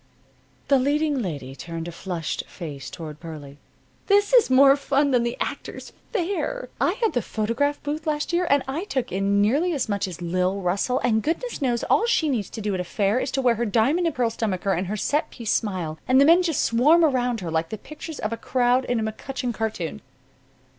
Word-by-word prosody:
The 275 -1 +4
leading 290 +1 +1
lady 140 - -5
turned 165 +2 -6
a - - -5
flushed 170 -2 -4
face 150 -6 -7
toward 155 -4 -8
Pearlie. 145 -4 -9 0.5
"This 405 +2 +3
is 485 - +6
more 270 +1 +7
fun 280 0 +1
than 250 -2 +3
the 235 0 -2
Actors' - - -5 0.2
Fair. 405 +5 -2
I - - +3
had 455 -3 0
the 245 - +1
photograph 230 +8 -1
booth 305 +2 -4
last 300 +2 -1
year, 350 0 +2
and 280 -1 +4
I 305 +8 -3
took 270 -11 -2
in 200 +2 +2
nearly 295 +12 +2
as 280 - -1
much 200 -2 -1
as 180 -3 -8
Lil 180 +3 0
Russell; 195 +7 0
and 220 -3 +2
goodness 335 - -3
knows, 245 -3 0
all 455 - +2
she 320 -9 +2
needs 230 -8 -1
to 225 - -7
do 205 -1 -1
at 185 - -2
a - - -1
fair 200 +5 0
is 260 - -2
to 270 0 -1
wear 245 -2 +4
her 235 +1 -1
diamond 270 - +2
and 325 - -2
pearl 240 -2 +1
stomacher 200 -4 -1
and 180 +2 -2
her 210 +3 -3
set 295 - 0
piece 230 -3 -4
smile, 180 -8 -2
and 255 +1 +5
the 280 - +7
men 335 +4 +6
just 330 -5 0
swarm 300 +9 +5
around 245 -5 0
her 170 -3 -4
like 165 0 -1
the 220 - -5
pictures 305 +5 -9
of 215 +2 -3
a - - -4
crowd 250 +1 +1
in 245 -2 0
a - - -1
McCutcheon 250 +1 -4
cartoon." 215 -8 -3
240 Hz, 215 wpm, -24 LUFS, 195-290 Hz, 0.5 s, more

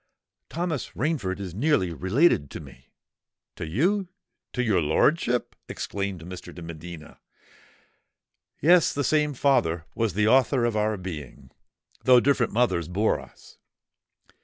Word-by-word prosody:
Thomas 165 -4 -3
Rainford 125 - -1
is 95 -4 -6
nearly 105 - +1
related 95 - +2
to - - -7
me——" - - -14 0.7
"To - - -6
you—to 180 - -2
your 100 -7 +2
lordship!" 120 - +1
exclaimed 100 -4 -4
Mr. 90 +1 -9
de 85 - -9
Medina. 85 0 -10 1.4
"Yes: 170 +3 +5
the 145 - -1
same 150 0 +1
father 85 - +1
was 115 -6 -1
the 105 +1 +2
author 130 +1 +3
of 120 -2 0
our 105 0 0
being—though 90 - -2
different 125 -2 +1
mothers 110 -9 +1
bore 100 +5 +1
us. - - -16
110 Hz, 120 wpm, -25 LUFS, 90-140 Hz, 1.4 s, Yes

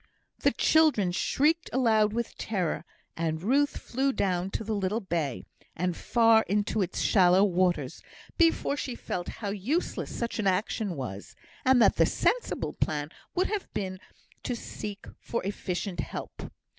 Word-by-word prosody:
The - - +4
children 300 - +3
shrieked 305 - +1
aloud 220 -4 +3
with 235 +1 -3
terror; 185 -7 -2 0.3
and 160 0 -2
Ruth 280 +7 +2
flew 270 +3 -1
down 185 -6 0
to 220 - -3
the 220 +1 -2
little 200 +1 0
bay, 165 - -2 0.3
and 180 +1 -1
far 225 -2 +4
into 210 +1 +1
its 185 -2 -2
shallow 185 -1 +5
waters, 185 -2 +1 0.3
before 330 -4 +3
she 260 -4 -4
felt 175 -6 -4 0.2
how - - 0
useless 240 - -2
such 235 -1 -3
an 205 - +1
action 195 0 0
was, 100 -8 -6 0.3
and 260 -1 +5
that - - +4
the - - +5
sensible - - 0
plan 145 -1 -2 0.3
would 370 +1 +2
have 420 -2 -3
been 185 -1 -3 0.4
to 245 - -2
seek 205 -3 -7
for 235 - -3
efficient 190 -2 -3
help. - - -6
205 Hz, 150 wpm, -28 LUFS, 180-245 Hz, 0.4 s, shallow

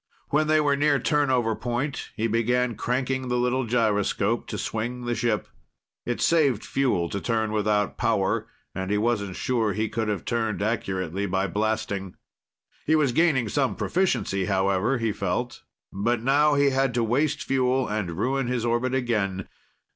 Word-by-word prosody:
When 155 +1 +2
they 155 0 +4
were 145 -2 +2
near 145 0 +3
turnover 130 -5 +1
point, 125 +5 -3
he 110 - -1
began 120 +2 +1
cranking 130 +3 -2
the 125 0 0
little 125 +1 0
gyroscope 110 -1 +1
to - - -4
swing 120 +3 -3
the 120 - 0
ship. 120 +1 -1 0.6
It 120 - -1
saved 140 -9 +2
fuel 125 -11 +1
to 100 - -4
turn 110 -2 0
without 105 -2 0
power, - - +1 0.3
and 95 0 -4
he 105 - +1
wasn't 105 -4 0
sure 115 -5 0
he 110 +2 -1
could 110 -1 -2
have 105 -3 -2
turned 110 -4 -1
accurately 95 -3 -2
by 95 +1 0
blasting. 100 -1 -2 0.7
He 160 - +4
was 150 -5 +3
gaining 135 -4 +2
some 135 +4 0
proficiency, 170 - 0
however, 100 +6 +1
he 115 -2 0
felt. 100 +6 -3 0.3
But 115 +4 0
now 145 +3 +4
he 140 -1 +3
had 135 -2 +1
to 120 - +2
waste 145 +6 0
fuel 130 0 +1
and 100 -6 -3
ruin 130 +4 0
his 120 -2 -1
orbit 120 +2 0
again. 105 -7 -1
120 Hz, 160 wpm, -25 LUFS, 105-130 Hz, 0.7 s, they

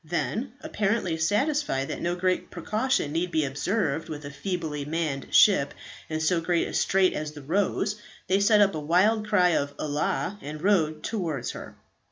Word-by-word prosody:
Then, 165 - -2
apparently 205 -4 -1
satisfied 205 - 0
that - - -4
no 175 +1 0
great 185 0 0
precaution 215 - -1
need 170 +3 -1
be 155 -3 +1
observed 160 +3 -1
with 150 -1 -6
a 140 - -6
feebly 150 -1 -3
manned 150 -2 -2
ship 145 -9 +5 0.3
in 155 0 -2
so 165 +2 +1
great 170 0 +1
a - - -7
strait 190 -1 +3
as 150 0 -4
the 145 -2 -10
"Rose," 200 +5 0 0.3
they 190 +2 +2
set 210 +1 +5
up 200 -1 +4
a 155 - -3
wild 195 +8 +2
cry 185 -4 +4
of 145 -4 0
"Allah!" 150 +5 -2
and 150 +1 -7
rowed 160 -4 +1
towards 165 - -2
her. - - -9
170 Hz, 175 wpm, -26 LUFS, 150-200 Hz, 0.3 s, ship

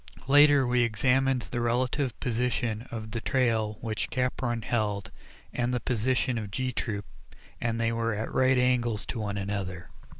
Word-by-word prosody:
Later 145 -1 +6
we 125 0 +2
examined 125 +2 +2
the 120 - -3
relative 125 +2 0
position 120 -1 -1
of 110 -2 -6
the 115 +1 -3
trail 110 -5 +1
which 110 -2 -3
Capron 125 -2 -1
held, 105 -4 -1 0.4
and 120 0 0
the 125 - 0
position 125 +1 0
of 105 -2 -6
G 130 +6 -2
Troop, 105 -4 -3 0.6
and 115 -1 -1
they 115 0 +1
were 115 -1 -1
at 110 +2 -4
right 130 0 +4
angles 120 -4 +1
to 120 - -4
one 105 -1 -3
another. 95 -3 -4
120 Hz, 160 wpm, -28 LUFS, 110-125 Hz, 0.6 s, Later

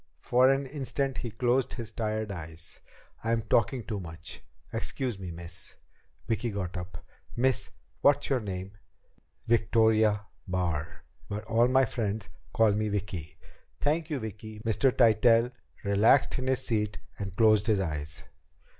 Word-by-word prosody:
For 125 +2 +4
an 135 +1 +1
instant 135 -1 -2
he 120 - -3
closed 125 +3 +1
his 120 -3 -6
tired 110 -1 -2
eyes. 80 -2 -9 0.4
"I'm 115 0 +1
talking 115 +3 +2
too 105 -2 -4
much. 80 -2 -7 0.3
Excuse 125 -7 -2
me, 95 -2 -6
miss." 85 +1 -6 0.5
Vicki 115 +1 0
got 95 -4 -4
up. 90 -1 -7 0.3
"Miss, 130 0 +2 0.3
what's 145 0 +4
your 135 -2 +2
name?" 95 -3 -5 0.7
"Victoria 110 -2 +3 0.2
Barr. 85 -4 -2 0.3
But 105 +1 -3
all 115 +2 +3
my 130 +1 +4
friends 110 -3 -3 0.2
call 110 -2 +4
me 105 +1 0
Vicki." 95 -6 -4 0.4
"Thank 155 +2 0
you, 150 - -1
Vicki." 110 -2 -7
Mr. 115 +4 +2
Tytell 115 0 +5 0.3
relaxed 105 +7 +4
in 130 - -3
his 130 -1 +1
seat 105 -2 0 0.2
and 100 -2 -5
closed 110 -2 +4
his 105 -3 +3
eyes. 75 -4 -3
110 Hz, 140 wpm, -29 LUFS, 95-120 Hz, 0.7 s, Tytell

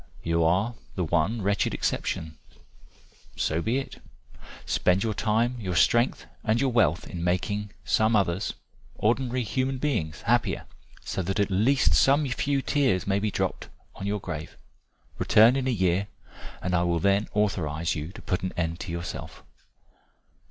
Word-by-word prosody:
You 85 0 +1
are 95 +8 +2 0.2
the 90 - 0
one 85 +7 0
wretched 100 +1 +1
exception 80 0 -2 1.0
so 80 +2 0
be 115 +8 0
it. 135 - -6 0.6
Spend 90 +1 +2
your 110 -1 0
time, 115 +4 +1
your 95 -5 -3
strength 120 - +3 0.2
and 110 0 +2
your 135 0 +1
wealth 90 -9 +2
in 85 -2 -5
making 100 +4 -1 0.2
some 110 +1 +3
others 95 -1 0 0.4
ordinary 125 +3 0
human 130 +4 -1
beings 85 - -2
happier, - - +1 0.4
so - - -2
that 95 +4 -2
at 100 0 +1
least 105 - +3
some 140 - +4
few 135 +2 0
tears 130 - +1
may 100 0 +1
be 105 +1 0
dropped - - -2 0.2
on 100 - -6
your 105 +1 -1
grave. 80 -5 -6 0.6
Return 115 +4 +6
in 135 -1 -1
a - - +2
year, 95 -3 +1 0.6
and 90 - -1
I 85 - +3
will 85 -1 +1
then 100 +4 +2
authorize 85 -6 0
you 75 -1 -4
to - - -11
put 90 - -1
an 95 - -3
end 85 0 -1
to 95 - -5
yourself." 85 +1 -6
100 Hz, 160 wpm, -26 LUFS, 85-115 Hz, 1.0 s, Return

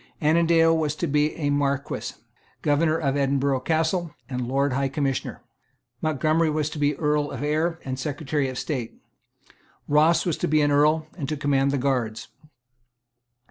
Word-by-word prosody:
Annandale 165 +1 +4
was 155 -2 -1
to 170 - -2
be 150 0 +1
a 145 -3 -1
Marquess, 140 -1 -2 0.4
Governor 155 +2 +2
of 140 -4 -1
Edinburgh 140 -1 +1
Castle, 160 +3 -1
and 125 -2 -3
Lord 135 +1 +1
High 135 +1 0
Commissioner. 135 -1 -2 0.6
Montgomery 155 +2 +1
was 155 0 -1
to 155 - -6
be 145 0 +2
Earl 150 -1 0
of 135 0 -5
Ayr 160 +3 0
and 130 -1 -4
Secretary 145 0 -2
of 130 - -6
State. 125 -7 -4 0.9
Ross 155 +3 +4
was 170 -4 0
to - - -1
be 155 0 +3
an 145 - +2
Earl 150 +2 +3
and 145 -7 -4
to 155 - -2
command 140 -1 +1
the 140 - 0
guards. 125 -6 -1
145 Hz, 160 wpm, -24 LUFS, 140-155 Hz, 0.9 s, Annandale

